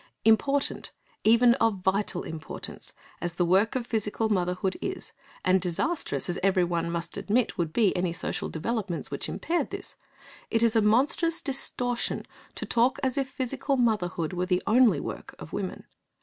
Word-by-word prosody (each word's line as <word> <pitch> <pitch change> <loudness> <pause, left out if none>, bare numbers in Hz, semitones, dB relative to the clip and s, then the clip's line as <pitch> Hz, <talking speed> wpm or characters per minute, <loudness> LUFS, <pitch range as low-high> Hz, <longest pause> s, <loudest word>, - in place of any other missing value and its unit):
Important, 275 +6 +2 0.3
even 235 +2 +6
of 215 -5 +2
vital 190 -1 0
importance, 160 -1 -7 0.3
as 175 0 -2
the 175 +1 +1
work 195 +7 +3
of 250 -2 -1
physical 220 -1 -1
motherhood 185 -1 0
is, 380 0 -4 0.3
and 185 0 +4
disastrous 270 - -1
as 175 0 -2
everyone 175 -3 +1
must 170 +2 -3
admit 210 +4 +1
would 165 -2 0
be 210 +2 +3
any 180 -1 0
social 170 - -3
developments 195 +1 -2
which - - -3
impaired 345 +1 -1
this, - - -7 0.5
it 225 0 +1
is 230 -1 +3
a 225 - +5
monstrous 280 +10 +3
distortion 250 -4 -1 0.3
to - - -4
talk 245 +2 +2
as 260 -2 +1
if 270 -2 -1
physical 270 +2 -2
motherhood 185 -9 0
were 180 0 -1
the 180 -1 +1
only 225 - +5
work - - -7
of - - -10
women. - - -4
215 Hz, 160 wpm, -27 LUFS, 180-245 Hz, 0.5 s, even